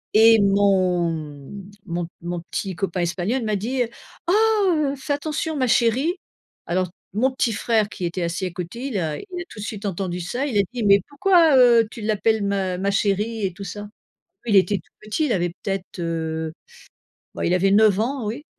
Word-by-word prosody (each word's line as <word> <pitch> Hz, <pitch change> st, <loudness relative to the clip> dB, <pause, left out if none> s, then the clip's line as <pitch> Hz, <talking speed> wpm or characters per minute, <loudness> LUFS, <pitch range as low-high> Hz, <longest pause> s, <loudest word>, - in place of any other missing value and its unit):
et 225 Hz, 0 st, +7 dB
mon 190 Hz, -3 st, +3 dB
m 155 Hz, +5 st, -8 dB
mon 170 Hz, -1 st, -3 dB
mon 175 Hz, 0 st, -4 dB
petit 190 Hz, -3 st, -3 dB
copain 185 Hz, -1 st, -2 dB
espagnol 190 Hz, +8 st, -1 dB
m'a 215 Hz, -1 st, 0 dB
dit: 245 Hz, +6 st, -1 dB, 0.4 s
«Oh 350 Hz, -, +3 dB, 0.6 s
,heu, -, -, -5 dB
fais 280 Hz, +2 st, -3 dB
attention 310 Hz, +2 st, -2 dB
ma 255 Hz, -2 st, +1 dB
chérie!» 245 Hz, -, +2 dB, 0.5 s
Alors 180 Hz, +1 st, 0 dB, 0.2 s
mon 250 Hz, +6 st, +2 dB
petit 240 Hz, -3 st, 0 dB
frère, 220 Hz, -2 st, +1 dB
qui 185 Hz, -, -5 dB
était 175 Hz, +1 st, -2 dB
assis 170 Hz, +2 st, -2 dB
à 180 Hz, -, -6 dB
côté, 180 Hz, +10 st, -6 dB
il 235 Hz, -, -3 dB
a 155 Hz, -3 st, -2 dB
il -, -, -8 dB, 0.2 s
a 345 Hz, -, -7 dB
tout 210 Hz, -, -11 dB
de -, -, -5 dB
suite 210 Hz, -2 st, -6 dB
entendu 185 Hz, -2 st, -3 dB
ça, 245 Hz, +11 st, -2 dB
il 230 Hz, -7 st, -1 dB
a -, -, +6 dB
dit: 240 Hz, -, -3 dB
«Mais 200 Hz, 0 st, +6 dB
pourquoi, 325 Hz, +1 st, +4 dB
heu, 235 Hz, -3 st, +6 dB
tu 230 Hz, -, -9 dB
l'appelles 215 Hz, 0 st, +1 dB
ma 190 Hz, -2 st, -1 dB
ma 195 Hz, -, 0 dB
chérie?» 205 Hz, +2 st, 0 dB
et 185 Hz, -, -2 dB
tout 200 Hz, +3 st, -9 dB
ça. 205 Hz, +2 st, -6 dB, 0.6 s
Il 210 Hz, -, +2 dB
était 200 Hz, +2 st, +4 dB
tout 165 Hz, -, -22 dB
petit, 215 Hz, +9 st, -1 dB
il 245 Hz, -, 0 dB
avait 175 Hz, -3 st, +1 dB
peut-être, 195 Hz, +1 st, -5 dB
heu, 160 Hz, -1 st, -3 dB, 0.8 s
bah, -, -, -2 dB
il 175 Hz, -, +2 dB
avait 195 Hz, +2 st, +3 dB
9 210 Hz, -1 st, +5 dB
ans, 250 Hz, +1 st, -1 dB
oui, 245 Hz, +9 st, -5 dB
200 Hz, 200 wpm, -22 LUFS, 180-230 Hz, 0.8 s, et